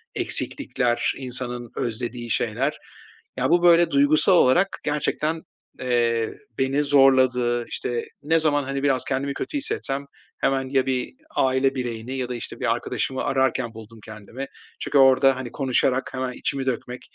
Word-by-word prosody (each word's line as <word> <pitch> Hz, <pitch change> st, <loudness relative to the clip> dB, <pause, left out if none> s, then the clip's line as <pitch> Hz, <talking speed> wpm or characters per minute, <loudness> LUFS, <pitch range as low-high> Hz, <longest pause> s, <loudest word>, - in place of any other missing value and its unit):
eksiklikler, 125 Hz, -, 0 dB
insanın 125 Hz, -2 st, -5 dB
özlediği 120 Hz, +1 st, -3 dB
şeyler, 120 Hz, +6 st, -1 dB, 0.6 s
ya, -, -, +1 dB
bu, 175 Hz, 0 st, +3 dB
böyle, 175 Hz, 0 st, +6 dB
duygusal 145 Hz, +6 st, +4 dB
olarak 180 Hz, +10 st, +3 dB
gerçekten, 150 Hz, +2 st, -1 dB, 0.4 s
eee, 120 Hz, -3 st, +1 dB, 0.3 s
beni 135 Hz, +2 st, +1 dB
zorladı. 130 Hz, -4 st, +3 dB
İşte, 120 Hz, -1 st, -3 dB, 0.2 s
ne 160 Hz, +2 st, +3 dB
zaman, 145 Hz, -3 st, +2 dB
hani, 135 Hz, +1 st, -3 dB
biraz 135 Hz, -3 st, +2 dB
kendimi 140 Hz, +1 st, -1 dB
kötü 290 Hz, -, -4 dB
hissetsem 140 Hz, -, -3 dB, 0.3 s
hemen 135 Hz, -1 st, 0 dB
ya 130 Hz, -1 st, +2 dB
bir 130 Hz, -, -2 dB, 0.2 s
aile 130 Hz, +1 st, +2 dB
bireyini 120 Hz, 0 st, -4 dB
ya 130 Hz, -2 st, -3 dB
da, 125 Hz, -, -3 dB
işte, 120 Hz, -, -7 dB
bir -, -, +2 dB
arkadaşımı 130 Hz, -1 st, -3 dB
ararken 130 Hz, -3 st, 0 dB
buldum 110 Hz, 0 st, -12 dB
kendimi. 110 Hz, +5 st, -8 dB, 0.3 s
Çünkü -, -, 0 dB
orada, 135 Hz, 0 st, +6 dB
hani, 125 Hz, -2 st, -6 dB
konuşarak 130 Hz, -1 st, 0 dB
hemen 130 Hz, -1 st, -2 dB
içimi 135 Hz, +1 st, -3 dB
dökmek, 125 Hz, -1 st, -3 dB
130 Hz, 145 wpm, -24 LUFS, 120-140 Hz, 0.6 s, böyle